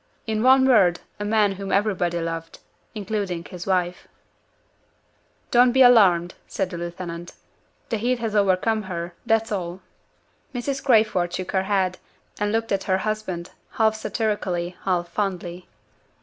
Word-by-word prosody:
In 220 Hz, -1 st, -1 dB
one 260 Hz, +2 st, +6 dB
word, 185 Hz, -9 st, +4 dB, 0.2 s
a -, -, -3 dB
man 210 Hz, -1 st, +2 dB
whom 195 Hz, 0 st, -5 dB
everybody 190 Hz, -4 st, +1 dB
loved 165 Hz, 0 st, -5 dB, 0.4 s
including 200 Hz, -5 st, -3 dB
his 180 Hz, -1 st, -8 dB
wife. 180 Hz, -2 st, -1 dB, 1.4 s
"Don't 245 Hz, 0 st, +5 dB
be 265 Hz, 0 st, +6 dB
alarmed," 185 Hz, -8 st, +5 dB
said 190 Hz, -2 st, -2 dB
the 175 Hz, -, -5 dB
lieutenant. 175 Hz, 0 st, -6 dB, 0.6 s
"The 225 Hz, -, 0 dB
heat 245 Hz, +4 st, 0 dB
has 225 Hz, -2 st, -3 dB
overcome 205 Hz, +2 st, +2 dB
her 170 Hz, 0 st, -4 dB
that's 225 Hz, -1 st, +2 dB
all." 180 Hz, -2 st, -3 dB, 0.7 s
Mrs. 270 Hz, +2 st, -3 dB
Crayford 215 Hz, -8 st, +3 dB
shook 185 Hz, 0 st, -4 dB
her 190 Hz, 0 st, 0 dB
head, 190 Hz, -2 st, +1 dB, 0.4 s
and 205 Hz, 0 st, 0 dB
looked 225 Hz, +1 st, -1 dB
at 195 Hz, -1 st, 0 dB
her 190 Hz, -1 st, +2 dB
husband, 190 Hz, -4 st, -3 dB, 0.2 s
half 220 Hz, -1 st, +3 dB
satirically, 205 Hz, -6 st, -2 dB
half 180 Hz, -2 st, 0 dB
fondly. 180 Hz, -3 st, -4 dB
195 Hz, 140 wpm, -23 LUFS, 175-220 Hz, 1.4 s, one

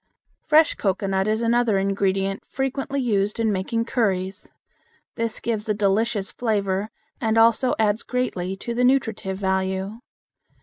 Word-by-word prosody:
Fresh 310 Hz, +1 st, +4 dB
Cocoanut 195 Hz, 0 st, 0 dB
is 220 Hz, +2 st, 0 dB
another 230 Hz, -2 st, +2 dB
ingredient 195 Hz, 0 st, 0 dB
frequently 270 Hz, +1 st, -2 dB
used 210 Hz, -4 st, 0 dB
in 225 Hz, -1 st, +2 dB
making 220 Hz, +4 st, -1 dB
curries. 195 Hz, -5 st, -1 dB, 0.6 s
This 230 Hz, -1 st, -2 dB
gives 220 Hz, -2 st, -2 dB
a 210 Hz, -, +2 dB
delicious 205 Hz, 0 st, +1 dB
flavor 205 Hz, -3 st, -1 dB, 0.3 s
and 225 Hz, -1 st, +1 dB
also 230 Hz, +3 st, +4 dB
adds 215 Hz, 0 st, +1 dB
greatly 195 Hz, -7 st, -2 dB
to 235 Hz, +5 st, -5 dB
the 245 Hz, +1 st, 0 dB
nutritive 225 Hz, -7 st, +1 dB
value. 190 Hz, +2 st, -1 dB
215 Hz, 130 wpm, -23 LUFS, 195-235 Hz, 0.6 s, Fresh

